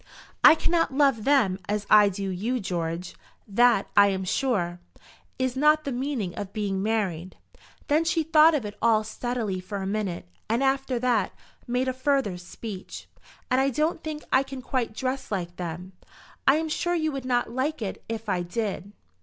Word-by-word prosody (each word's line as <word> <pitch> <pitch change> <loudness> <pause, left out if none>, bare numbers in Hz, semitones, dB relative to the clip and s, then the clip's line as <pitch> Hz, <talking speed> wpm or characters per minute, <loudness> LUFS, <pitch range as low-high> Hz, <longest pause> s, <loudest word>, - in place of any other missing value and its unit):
"I - - +10
cannot 330 -1 +1
love 275 -7 +3
them 235 -10 +3
as 210 0 -1
I 210 -1 +7
do 195 0 -4
you, 225 +8 -2
George. 175 -3 -3 0.3
That, 230 0 +3
I 205 0 +7
am 190 -1 -1
sure, 185 -5 -1 0.6
is 260 -1 -1
not 300 +3 +4
the 280 - -3
meaning 250 -7 -2
of 200 -1 -6
being 200 -3 -2
married." 190 -5 -2 0.5
Then 305 +3 +3
she 330 0 +1
thought 315 +1 +6
of 265 -7 -2
it 205 0 -6
all 220 -2 +4
steadily 220 -3 -3
for 195 +3 -6
a 190 - -4
minute, 195 - -3 0.2
and 235 +4 +1
after 270 -1 +1
that, 235 -4 +1 0.3
made 250 +2 0
a 260 - 0
further 260 -8 0
speech. 190 +2 -8 0.4
"And 255 +1 +4
I 270 - +2
don't 310 +5 -1
think 305 -1 -5
I 260 - +6
can 270 -1 -7
quite 245 -4 -2
dress 260 +1 -3
like 175 -3 -3
them. 180 +1 -6 0.6
I'm 310 +4 +4
sure 345 +3 -1
you 315 -2 0
would 275 -2 -5
not 245 -2 0
like 275 +5 -1
it 195 - -5
if 225 -1 -5
I 185 -3 0
did." 200 +1 -4
230 Hz, 180 wpm, -26 LUFS, 195-270 Hz, 0.6 s, I